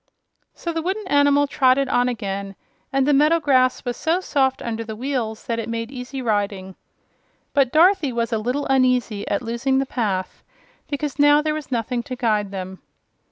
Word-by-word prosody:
So 335 - -4
the 325 - -2
wooden 380 +4 -3
animal 285 -2 +4
trotted 275 -1 +2
on 245 0 +2
again 200 -4 -4 0.4
and 270 0 +2
the 295 - +4
meadow 305 +4 +4
grass 260 -4 +2
was 245 -1 -2
so 330 +7 0
soft 265 -7 0
under 230 -1 -3
the 220 -1 -7
wheels 235 -3 -3
that 230 -1 -2
it 230 - -4
made 230 +1 -4
easy 260 0 -6
riding. 200 -4 -1 0.8
But 275 -3 +3
Dorothy 330 -2 +4
was 235 0 -2
a 220 - +1
little 250 +6 -2
uneasy 255 -6 +1
at 200 - -1
losing 240 +3 0
the 270 - +1
path, 200 -8 -3 0.5
because 290 0 -4
now 290 +1 +5
there 305 0 0
was 305 -3 -6
nothing 240 0 -1
to 255 +1 -6
guide 215 -5 0
them. 190 -1 -7
255 Hz, 180 wpm, -22 LUFS, 225-285 Hz, 0.8 s, now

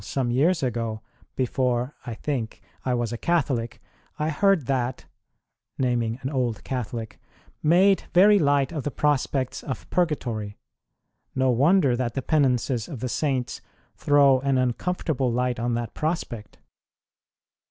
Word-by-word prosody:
some 130 -3 -1
years 155 +7 +2
ago, 115 -3 -2 0.4
before 125 0 0
(I 115 - -4
think) 120 -4 -4 0.2
I 125 -1 0
was 120 -1 -2
a 115 - -5
Catholic, 130 -9 0 0.4
I 155 0 -1
heard 195 -1 +2
that 130 -1 -2 0.7
(naming 120 -3 0
an 135 - -2
old 125 -5 -1
Catholic) 115 -3 -5 0.4
made 185 +4 +4
very 205 +3 +6
light 145 -3 +2
of 155 -3 -3
the 145 - -2
prospects 140 -3 0
of 130 - -6
Purgatory. 120 - -1 0.8
No 130 -1 +3
wonder 140 +2 +4
that 120 -2 -2
the 135 - -2
Penances 125 -6 +1
of 135 - -7
the 125 - -3
Saints 130 -3 -1 0.3
throw 140 -2 +4
an 135 0 +1
uncomfortable 130 +1 0
light 125 0 0
on 120 0 0
that 115 -1 -4
prospect. 155 -10 -4
130 Hz, 135 wpm, -25 LUFS, 120-150 Hz, 0.8 s, very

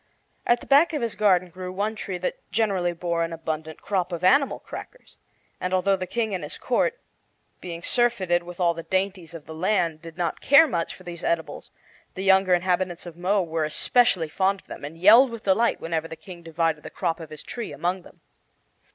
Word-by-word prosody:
At 240 0 +3
the - - -11
back 295 +5 +5
of 295 - -1
his 230 - -1
garden 185 -4 +2
grew 185 +1 -7
one 205 +4 -2
tree 195 -3 -5
that 180 - -3
generally 200 -5 +1
bore 170 0 -1
an 165 - -3
abundant 160 -1 -5
crop 185 -3 -1
of 170 0 -5
animal 275 +8 +4
crackers, - - -11 0.4
and 185 +1 -1
although 195 +2 +2
the 185 -1 -5
King 225 -1 -2
and 180 -4 -3
his 150 - -5
court, 465 - 0 0.6
being 170 -1 -7
surfeited 190 -8 +2
with 175 +1 -11
all 170 -2 +3
the 165 - -6
dainties 185 -2 -2
of 155 -3 -10
the 160 - -9
land, 165 -2 0
did 165 -1 -11
not 170 -3 -2
care 290 +4 +7
much 170 - -2
for 185 - -16
these 175 -2 -8
edibles, 170 -1 -2 0.5
the 190 - -4
younger 190 -1 +5
inhabitants 180 0 -1
of 175 -2 -9
Mo 185 +3 +1
were 165 -1 -2
especially 175 +3 +2
fond 190 +4 0
of - - -37
them, - - -9
and 150 +3 -7
yelled 225 +9 +7
with 230 -2 -8
delight 205 +5 +2
whenever 165 -1 -2
the 160 - -8
King 170 +2 -12
divided 165 -1 -1
the - - -9
crop 165 0 -2
of 160 -2 -9
his 155 -1 -9
tree 235 -3 -6
among 180 +3 -2
them. - - -18
180 Hz, 210 wpm, -25 LUFS, 165-200 Hz, 0.6 s, care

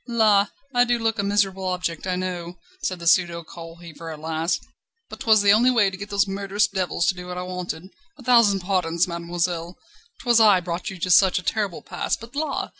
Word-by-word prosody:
"La! 215 -4 +3 0.3
I 245 0 +5
do 240 0 +1
look 225 -1 -1
a - - +1
miserable 195 -1 0
object, 180 -2 -3
I 185 - 0
know," 180 -1 -4 0.2
said 185 - -2
the 170 - -9
pseudo 170 0 +3
coal 165 0 -11
heaver 170 -1 -10
at 155 -1 -7
last, 160 +2 -2 0.5
"but - - -9
'twas 220 -2 +4
the 200 0 +6
only 235 +4 +4
way 220 -6 +3
to - - -7
get 200 +2 -8
those 200 0 +1
murderous 200 +1 0
devils 185 -3 -1
to - - +3
do 180 0 -9
what 180 0 -6
I 180 - -3
wanted. 180 -1 -5 0.3
A 265 - -13
thousand 230 -6 +4
pardons, 180 -2 0
mademoiselle; 170 0 -3 0.5
'twas 240 -2 +4
I 210 -4 +6
brought 175 0 -4
you 190 - -8
to 180 +1 -2
such 190 +1 +5
a 180 - -3
terrible 200 -1 -2
pass, 175 - -2
but 230 +4 -13
la! 310 +2 -2
185 Hz, 215 wpm, -23 LUFS, 175-205 Hz, 0.5 s, the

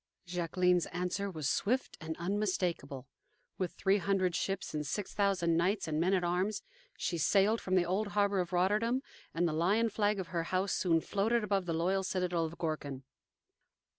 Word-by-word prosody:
Jacqueline's 180 0 +1
answer 180 +3 -2
was 155 -6 -3
swift 250 - 0
and 160 0 -5
unmistakable. 175 -8 -2 0.5
With 185 -2 -2
three 195 +1 +2
hundred 185 -2 +1
ships 195 +1 -2
and 150 -1 -1
six 190 +8 -4
thousand 185 -5 +2
knights 190 +4 +1
and 155 -1 -1
men 185 +4 +3
at 180 - 0
arms, 185 +5 0 0.3
she 170 - -2
sailed 200 +8 +3
from 185 - 0
the 180 -2 +4
old 195 +5 0
harbor 200 -1 +3
of 180 -1 -2
Rotterdam, 210 +8 +1 0.3
and 175 +1 +1
the 160 - -1
lion 200 +8 +2
flag 210 -1 +1
of 185 - -5
her 170 -2 -2
house 185 +2 0
soon 165 -3 +2
floated 220 +6 +1
above 195 -3 0
the 165 - 0
loyal 185 +4 +1
citadel 180 -3 0
of 160 +1 -7
Gorkum. 145 -5 -3
185 Hz, 175 wpm, -32 LUFS, 170-200 Hz, 0.5 s, the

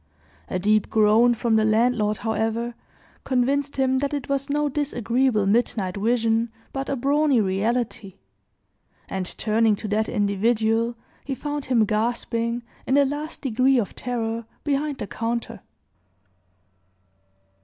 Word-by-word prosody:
A - - -1
deep 210 +3 +2
groan 220 +3 +4
from 225 0 +1
the 220 - +3
landlord, 215 -1 +2
however, 225 +1 -1 0.5
convinced 275 +2 0
him 265 -1 +2
that 285 +1 -1
it 280 - -4
was 275 0 -1
no 295 +1 +1
disagreeable 255 -5 0
midnight 200 -3 +1
vision, 225 +2 +1 0.2
but 270 0 -3
a 275 - 0
brawny 280 +1 +2
reality; 210 0 -1 0.9
and 190 -1 -3
turning 220 0 +2
to 210 - -6
that 215 +1 0
individual, 225 +3 +1 0.3
he 270 - -3
found 290 0 -4
him 235 -4 +3
gasping, 230 +2 -1 0.2
in 265 - +2
the 285 0 +5
last 295 +3 -4
degree 260 +1 +3
of 215 -6 -1
terror, 230 -2 -3 0.2
behind 290 0 -1
the - - -4
counter. 230 +2 -3
235 Hz, 130 wpm, -24 LUFS, 215-265 Hz, 0.9 s, the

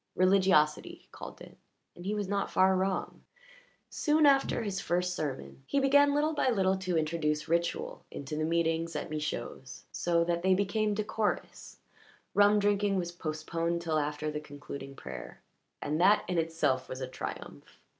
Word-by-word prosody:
Religiosity, 185 -5 +3
he - - -25
called - - -9
it - - -12 0.4
and 175 +2 -9
he 210 - 0
was 205 -2 -2
not 200 0 -1
far 190 0 +4
wrong. 190 0 -2 0.7
Soon 305 0 +2
after 275 -4 +3
his 195 -2 -3
first 180 0 0
sermon 140 -4 -5
he 280 - +1
began 285 +1 +5
little 305 +2 +2
by 285 - +1
little 190 -5 +2
to 185 -2 -1
introduce 155 -1 -1
ritual 170 +1 -1
into 140 +2 -6
the 155 - -1
meetings 165 0 0
at 170 - -4
Michaud's, 135 -3 -5
so 170 -1 +1
that 170 0 -1
they 190 +1 +4
became 205 +2 0
decorous; 215 0 -3 0.6
rum 205 +1 +5
drinking 205 -1 +2
was 175 -1 -2
postponed 165 +1 -3
till 160 -2 +1
after 150 +1 -2
the 150 - -3
concluding 140 -2 -9
prayer, - - -9 0.4
and 150 +3 -1
that 200 +3 +5
in 180 -2 0
itself 160 -5 0
was 130 - -5
a 130 - -3
triumph. 130 - -8
175 Hz, 165 wpm, -30 LUFS, 155-200 Hz, 0.7 s, began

